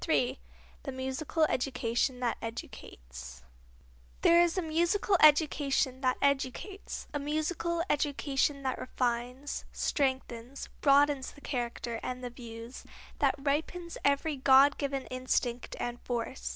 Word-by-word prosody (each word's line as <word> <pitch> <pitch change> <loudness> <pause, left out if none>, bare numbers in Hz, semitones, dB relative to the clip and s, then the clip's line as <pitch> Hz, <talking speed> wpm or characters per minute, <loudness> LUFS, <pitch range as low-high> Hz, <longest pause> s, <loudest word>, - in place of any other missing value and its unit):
III 255 -3 +2 0.4
The 270 - -5
Musical 265 +5 -1
Education 250 -2 0
That 240 -2 +1
Educates 60 - -8 0.8
There 340 0 +7
is 345 +1 +2
a 370 - +1
musical 345 +6 +2
education 285 -4 +4
that 255 -1 +2
educates, 280 +8 -1
a 290 - -1
musical 315 +3 -1
education 280 -2 0
that 260 -1 -1
refines, 250 +3 -2
strengthens, 260 -2 -2
broadens 280 -1 +4
the 285 - -16
character 240 -3 -3
and 255 0 -5
the 245 - -4
views, 230 0 -9 0.4
that - - +3
ripens 315 +5 -2
every 280 +2 +1
God 270 +2 +6
given 275 -2 -2
instinct 255 -1 -1
and 240 0 -4
force. 245 +1 -3
270 Hz, 120 wpm, -30 LUFS, 245-295 Hz, 0.8 s, There